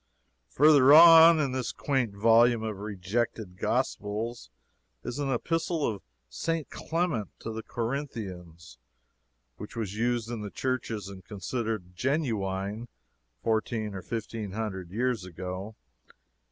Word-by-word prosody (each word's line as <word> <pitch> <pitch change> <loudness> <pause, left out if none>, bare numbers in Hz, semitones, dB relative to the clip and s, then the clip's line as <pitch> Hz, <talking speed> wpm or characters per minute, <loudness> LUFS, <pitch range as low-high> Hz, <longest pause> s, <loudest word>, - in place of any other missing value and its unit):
Further 145 - +6
on 165 0 +9
in 140 -3 0
this 130 -2 -2
quaint 130 -8 -1
volume 115 +2 +4
of 110 -3 -4
rejected 105 0 -3
gospels 115 - -2 0.5
is 125 +4 -5
an 140 -2 -1
epistle 165 +4 -1
of 100 -3 -2 0.3
St. 160 - -3
Clement 165 - -2
to 115 - -6
the 110 - -5
Corinthians, 95 - -6 0.8
which 105 - -9
was 110 -4 -3
used 120 0 -1
in 115 -2 -4
the 105 - -5
churches 115 -5 -3
and 95 -1 -10
considered 105 -2 -4
genuine 110 - -2 0.6
fourteen 110 -1 -1
or 95 - -6
fifteen 110 -2 -5
hundred 95 -5 -4
years 120 +1 -1
ago. 95 +4 -6
115 Hz, 120 wpm, -28 LUFS, 100-130 Hz, 0.8 s, on